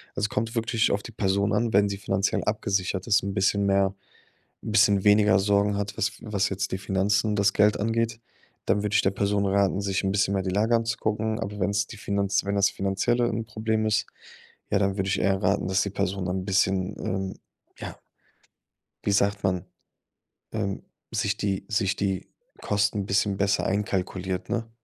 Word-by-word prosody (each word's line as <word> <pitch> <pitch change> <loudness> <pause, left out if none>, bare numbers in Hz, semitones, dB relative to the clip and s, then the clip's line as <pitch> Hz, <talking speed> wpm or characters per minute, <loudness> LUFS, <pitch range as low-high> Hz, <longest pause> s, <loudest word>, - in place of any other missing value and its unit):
Es 105 - 0
kommt 115 +4 -2
wirklich 115 0 +1
auf 100 0 -1
die 120 - -9
Person 100 0 +1
an, 115 -1 +1
wenn 100 +1 +5
sie 100 - -3
finanziell 95 0 0
abgesichert 95 -3 -1
ist, 105 -3 +3
'n 100 -1 -3
bisschen 100 +1 +2
mehr 100 0 +2 0.7
'n 110 - -4
bisschen 105 -3 +4
weniger 105 -1 +5
Sorgen 100 0 +2
hat, 100 0 -3
was 105 +1 +1
was 100 -3 -1
jetzt 100 +1 -3
die 95 - -2
Finanzen 100 +2 +1
das 100 -1 +2
Geld 105 0 +3
angeht, 115 +1 0 0.5
dann 100 +1 +2
würde 105 0 -1
ich - - +5
der 95 - +2
Person 100 0 0
raten, 100 0 +2
sich 100 -1 -1
'n 95 - +1
bisschen 100 0 +1
mehr 95 - 0
die 95 - -2
Lage 110 +5 +2
anzugucken. 110 -1 -1
Aber 105 -2 -5
wenn's 100 +2 +1
die 110 - -10
Finanz 100 -1 0
wenn 100 0 -1
das 100 0 +4
Finanzielle 100 +5 0
'n 115 0 -3
Problem 110 0 -1
ist, 110 0 +1 0.6
ja, 100 - +3
dann 100 0 0
würde 95 0 -1
ich 95 - +1
eher 95 -1 +1
raten, 100 0 +1
dass 95 +1 +2
die 100 - -4
Person 95 -2 -2
ein 95 +1 -2
bisschen, 95 -1 +1
ähm, 95 0 -3 0.4
ja - - -7 1.1
wie 100 - +1
sagt 100 0 +1
man, 90 -2 0 0.9
ähm, 100 -3 -3 0.3
sich 110 -2 0
die 100 -2 -2
sich 105 -2 +1
die 95 -2 -2 0.3
Kosten 105 0 0
'n 100 - -4
bisschen 100 0 +1
besser 100 +1 +1
einkalkuliert, 95 -2 -2
ne? 115 -1 -2
100 Hz, 190 wpm, -26 LUFS, 95-105 Hz, 1.1 s, wenn